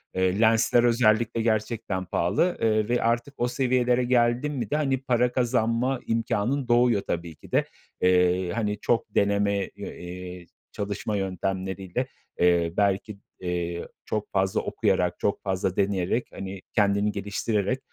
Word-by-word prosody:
Iıı, 95 +2 +1
lensler 115 +1 +4
özellikle 115 -1 +3
gerçekten 110 -3 -1
pahalı, 100 - +1
ııı, 110 -1 +2
ve 120 0 +1
artık 120 +4 0
o 120 - +1
seviyelere 125 -1 +1
geldin 120 +3 +2
mi 120 -7 -3
de - - +2
hani 135 -3 +1
para 125 -1 +2
kazanma 120 +1 +1
imkânın 115 +4 0
doğuyor 120 -3 +4
tabii 85 -1 -3
ki - - -17
de. - - +2 0.4
Eee, 90 0 +3
hani 105 -1 -2
çok 115 -1 -1
deneme, 100 0 +2
eee, 90 0 -8 0.3
çalışma 100 +1 -3
yöntemleriyle, 95 0 -3 0.3
eee, 85 -1 +3
belki, 100 +1 +1 0.2
eee, 85 -1 -3 0.2
çok 105 -1 -3
fazla 95 -1 +1
okuyarak, 90 -1 0
çok 100 - 0
fazla 95 -1 -1
deneyerek, 100 +3 0
hani, 95 -1 -7
kendini 100 -1 +2
geliştirerek, 105 +3 -1
105 Hz, 135 wpm, -26 LUFS, 95-120 Hz, 0.4 s, lensler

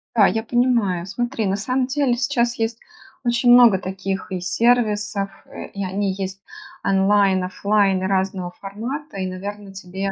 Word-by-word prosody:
Да, 210 -4 +6
я 220 +3 -1
понимаю. 230 -8 +1
Смотри, 235 +3 -2
на 190 - +1
самом 255 +5 -1
деле, 270 -3 +1
сейчас 240 -1 0
есть 225 +1 -1 0.4
очень 240 0 +3
много 240 -6 +7
таких 190 0 -4
и 185 - -2
сервисов. 210 -1 +1 0.2
Э, - - -8
и 200 - -5
они 195 +1 -1
есть 190 0 -5 0.4
онлайн, 195 -1 +3
офлайн 195 0 +1
и - - 0
разного 190 -2 -1
формата. 230 +7 -6
И, 190 - -2
наверное, 195 +2 -6
тебе 195 +1 -4
200 Hz, 155 wpm, -21 LUFS, 190-235 Hz, 0.4 s, много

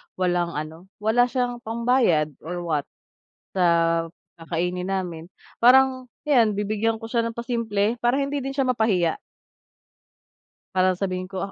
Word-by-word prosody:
walang 175 -2 0
ano, 160 +4 -6 0.2
wala 245 +3 +4
siyang 245 -1 -2
pambayad 230 - +1
or 175 +2 -5
what, 150 -4 -1 0.7
sa 185 - +2 0.8
kakainin 180 +3 -2
namin, 175 -3 -4 0.3
parang 255 0 +5 0.2
'yan, 235 -7 +4
bibigyan 215 +2 0
ko 225 - -7
siya 230 0 0
ng 230 0 -4
pasimple, 230 -2 0
para 245 +4 +3
hindi 280 -1 -2
din 270 - -3
siya 270 -1 0
mapahiya. 210 -9 +2 1.6
Para 185 -1 +3
sabihin 185 -1 -3
ko, 190 -1 -4
210 Hz, 130 wpm, -24 LUFS, 180-245 Hz, 1.6 s, parang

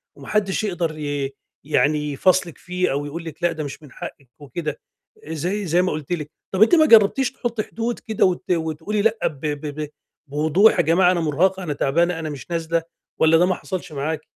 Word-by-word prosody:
وما - - -12
حدش 210 -1 0
يقدر 175 -6 -2
ي 145 -2 -2 0.3
يعني 150 0 +1
يفاصلِك 175 +2 +2
فيه 180 0 -1
أو 145 +2 -1
يقول 165 +3 -6
لِك 165 +2 -9
لأ 175 - +3
ده 155 -1 -4
مش 145 +2 -7
من 145 - -14
حقِّك 135 -3 -9
وكده، 150 +1 -5 0.5
زي، 180 +6 -2
زي 175 +2 +3
ما 185 - 0
قُلت 155 +2 -5
لِك، 150 -3 -4 0.2
طَب 190 +2 -1
أنتِ 290 - +5
ما 315 -2 +6
جرّبتيش 245 +1 +5
تحطي 235 -4 -3
حدود 230 +2 -3
كده 220 -3 +1
وت 185 0 -1
وتقولي 165 +5 -1
لأ 225 +1 +2
ب 145 - -7
ب 150 -1 -3
ب 150 - -4 0.4
بوضوح 155 +9 +4
يا 175 - +5
جماعة 180 +3 +4
أنا 180 - +1
مرهقة، 185 +5 +1
أنا 150 -4 -2
تعبانة، 170 +5 +1
أنا 160 -1 -4
مش 145 +3 -8
نازلة، 165 0 0 0.3
والَّا 160 +1 +5
ده 175 - +4
ما 185 -1 +1
حَصَلش 185 -3 -6
معاكِ؟ 150 +2 -2
165 Hz, 205 wpm, -22 LUFS, 150-190 Hz, 0.5 s, ما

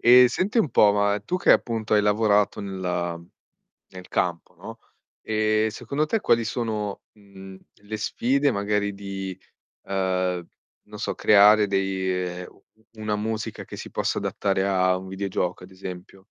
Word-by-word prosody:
Ehm, 125 +1 +8
senti 190 - -1
un 160 - +2
po', 105 -1 +5
ma 100 0 +1
tu 180 - -2
che 185 - +2
appunto 110 -2 +2
hai 105 - +4
lavorato 105 -1 +2
nella 90 -3 -3 0.7
nel 90 -1 -11
campo, 90 0 -2
no, 115 +6 -10 0.4
ehm, 110 0 +1
secondo 145 +7 -2
te 225 +7 0
quali 115 0 +3
sono, 105 -3 -3
mhmm, 95 -2 -13 0.2
le 105 +1 -7
sfide 135 +6 +1
magari 100 0 -1
di, 95 -1 -6 0.4
uhm, 95 -2 -1 0.4
non 105 0 -12
so - - -2
creare 105 0 +6
dei 95 -1 -1
ehm, 90 -1 -3
u - - -24 0.4
una 105 -1 -1
musica 110 +1 -4
che - - -9
si - - -8
possa - - -1
adattare 95 -1 -1
a 95 -1 +2
un 95 0 -9
videogioco 95 -2 -3
ad 95 - -13
esempio? 95 0 -9
100 Hz, 155 wpm, -24 LUFS, 95-110 Hz, 0.7 s, Ehm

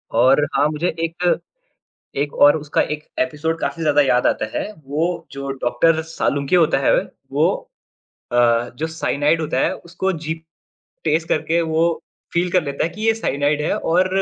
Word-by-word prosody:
और 130 +5 +5
हाँ 145 - +4
मुझे 155 +3 -1
एक, 170 +2 0 0.8
एक 145 +1 -1
और 145 +2 +6
उसका 150 -1 -1
एक 150 0 -4 0.2
एपिसोड 160 +1 -1
काफ़ी 165 - -3
ज़्यादा 145 -1 +4
याद 125 -2 +2
आता - - +1
है। 215 - -3
वो 160 +6 -2
जो 140 0 -5
डॉक्टर 160 +7 +3
सालुंखे 145 -1 0
होता 165 -2 +4
है - - +3 0.4
वो - - +3 0.8
अ, 120 0 +3
जो 160 - -2
साइनाइड 160 0 0
होता 150 -4 -1
है - - +1
उसको 185 +2 -3
जीभ 160 0 -4 0.6
टेस्ट 160 +1 +1
करके 165 +2 +1
वो 160 0 +1 0.5
फ़ील 175 +1 +1
कर 180 -3 +3
लेता 140 +1 -2
है 165 - -1
कि 215 - -11
ये 225 - +4
साइनाइड 145 -7 0
है - - 0
और 180 +3 +2
160 Hz, 170 wpm, -20 LUFS, 145-165 Hz, 0.8 s, और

